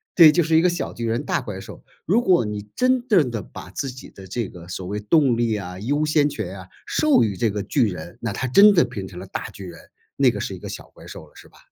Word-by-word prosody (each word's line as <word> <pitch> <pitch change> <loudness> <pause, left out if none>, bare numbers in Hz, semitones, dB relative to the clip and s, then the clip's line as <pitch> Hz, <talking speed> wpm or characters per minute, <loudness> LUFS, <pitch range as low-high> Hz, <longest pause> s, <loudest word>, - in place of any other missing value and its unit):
对， 170 -3 +9
这 - - +8
就 175 - +3
是 160 +1 +1
一 - - +5
个 180 - +4
小 170 -6 -4
巨 115 - -5
人 115 +5 -1
大 - - 0
怪 105 -6 -7
兽， 95 - -11 0.2
如 210 +8 +3
果 180 - +3
你 105 -1 -4
真 255 0 +1
正 175 - +3
地 115 -3 -3
把 90 - -11
自 140 +5 -4
己 130 0 -10
的 95 -1 -13
这 115 +3 -3
个 85 -2 -12
所 95 +1 -6
谓 100 +3 -4
动 125 +3 +3
力 115 -2 +1
啊， 90 -2 -6
优 145 +8 0
先 150 -1 +2
权 100 -7 -6
啊， 95 - -11 0.2
授 305 - +3
予 105 -3 -1
这 115 +4 +1
个 105 0 -3
巨 115 +2 +1
人， 90 -1 -8
那 115 - -2
它 130 - -3
真 200 - +7
的 170 - +5
变 95 -2 -6
成 90 - -12
了 95 - -8
大 95 - -6
巨 100 - -10
人， 85 -2 -10 0.4
那 - - +5
个 - - -3
是 - - -4
一 - - -11
个 - - -8
小 - - -8
怪 - - -15
兽 - - -10
了 - - -24
是 - - -14
吧？ - - -22
115 Hz, 305 characters per minute, -22 LUFS, 100-155 Hz, 0.4 s, 对